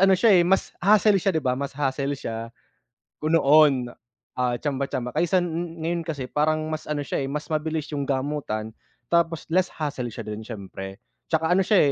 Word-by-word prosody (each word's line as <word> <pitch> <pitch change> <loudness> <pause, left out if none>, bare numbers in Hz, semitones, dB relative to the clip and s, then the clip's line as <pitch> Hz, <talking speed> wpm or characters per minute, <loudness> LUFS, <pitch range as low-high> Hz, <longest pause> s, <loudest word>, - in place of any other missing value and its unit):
ano 195 0 +6
siya, 225 +2 +5
eh, - - +5
mas 190 +1 +2
hassle 205 +1 +5
siya 195 -1 +1
di 160 - 0
ba, 125 - +2
mas 140 0 -4
hassle 140 0 -1
siya, 115 -2 -5 0.7
ko 155 - -2
noon, 145 -5 +5 0.5
ah, 125 -1 +1
tsamba 140 0 -2
tsamba 125 -1 -3
kaysa 175 +4 +2
ngayon 170 0 -3
kasi 140 -5 -4
parang 155 +1 +1
mas 155 - -5
ano 150 -1 -1
siya, - - -2
eh, - - -4
mas 150 +3 -4
mabilis 155 0 -1
'yong 140 -2 -2
gamutan, 135 -6 -2 0.4
tapos 170 -1 +2
less 185 +2 +3
hassle 145 -5 -4
siya - - -6
do'n 105 +1 -6
siyempre. 95 -1 -8 0.3
Tsaka 160 0 +1
ano 190 +1 +4
siya, 185 -9 +5
150 Hz, 185 wpm, -25 LUFS, 130-165 Hz, 0.7 s, ano